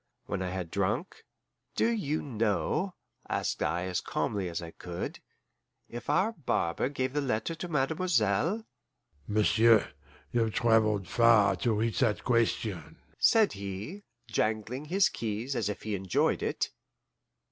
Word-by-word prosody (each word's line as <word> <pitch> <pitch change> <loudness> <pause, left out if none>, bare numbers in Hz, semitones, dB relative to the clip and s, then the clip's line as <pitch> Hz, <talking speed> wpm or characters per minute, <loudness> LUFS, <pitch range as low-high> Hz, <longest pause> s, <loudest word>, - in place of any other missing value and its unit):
When 100 - -3
I 90 - -2
had 90 -2 -4
drunk, - - -2 0.5
"Do - - +3
you 195 -10 -1
know," 120 - 0 0.3
asked - - -1
I 90 +1 0
as 90 -1 -1
calmly 95 -3 -2
as 85 - -3
I 85 -1 -7
could, 85 0 -6 0.7
"if 120 +3 -8
our 190 +9 +3
barber 130 - -1
gave 130 -2 -2
the 145 - +1
letter 125 +3 -1
to 165 +2 -6
Mademoiselle?" 160 - +1 0.6
"M'sieu', 110 +1 +5 0.5
you've 115 -3 +1
travelled 110 -5 +3
far 110 -2 +5
to 115 +5 +1
reach 110 +1 0
that 115 -5 +1
question," 115 -5 0 0.2
said 220 -2 +5
he, 100 - -6 0.2
jangling 110 +6 -1
his 185 +5 +3
keys 115 +4 -3
as 115 -4 0
if 105 - -5
he 110 - -3
enjoyed 95 -2 +1
it. - - -1
115 Hz, 135 wpm, -30 LUFS, 100-145 Hz, 0.7 s, M'sieu